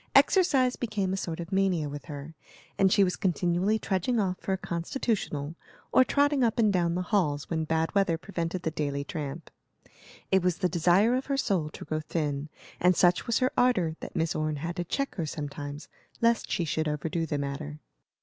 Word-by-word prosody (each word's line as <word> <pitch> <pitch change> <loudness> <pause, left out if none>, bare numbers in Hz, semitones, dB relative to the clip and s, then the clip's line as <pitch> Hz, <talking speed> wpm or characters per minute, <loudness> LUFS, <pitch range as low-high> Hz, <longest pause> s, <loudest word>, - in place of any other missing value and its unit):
Exercise 275 -10 +5
became 210 -5 -1
a - - +1
sort 170 -4 -4
of 170 +2 -6
mania 190 -5 +2
with 145 -2 -7
her, 145 +2 -8 0.4
and 190 -1 +3
she 200 - +5
was 180 -1 +1
continually 180 +3 +1
trudging 210 +3 0
off 185 -3 0
for - - -4
a 190 - +1
constitutional, 170 - -2 0.4
or 260 - +6
trotting 285 0 +2
up 230 0 +1
and 215 -3 +3
down 170 -2 +1
the 180 - -1
halls 170 -8 0
when 160 -1 0
bad 160 +1 0
weather 195 -5 +2
prevented 175 0 -4
the 160 - -1
daily 145 -3 -2
tramp. 150 +1 -6 0.8
It 190 0 +5
was 180 -1 +1
the 185 - +1
desire 180 +7 +3
of 260 +1 -1
her 275 -1 0
soul 185 - 0
to - - -10
grow 155 - -2
thin, 150 -2 -2 0.3
and 180 +1 +4
such 175 +7 +3
was 235 - +2
her 255 0 +2
ardor 185 -11 +2
that - - -8
Miss 160 -1 +1
Orne 155 0 -1
had 165 +4 -4
to 175 - 0
check 275 - -2
her 165 -3 -1
sometimes, 145 0 -6 0.3
lest 230 -1 +2
she 175 - 0
should 160 0 -1
overdo 160 +2 -2
the 145 - -1
matter. 145 +2 -4
175 Hz, 200 wpm, -28 LUFS, 155-200 Hz, 0.8 s, or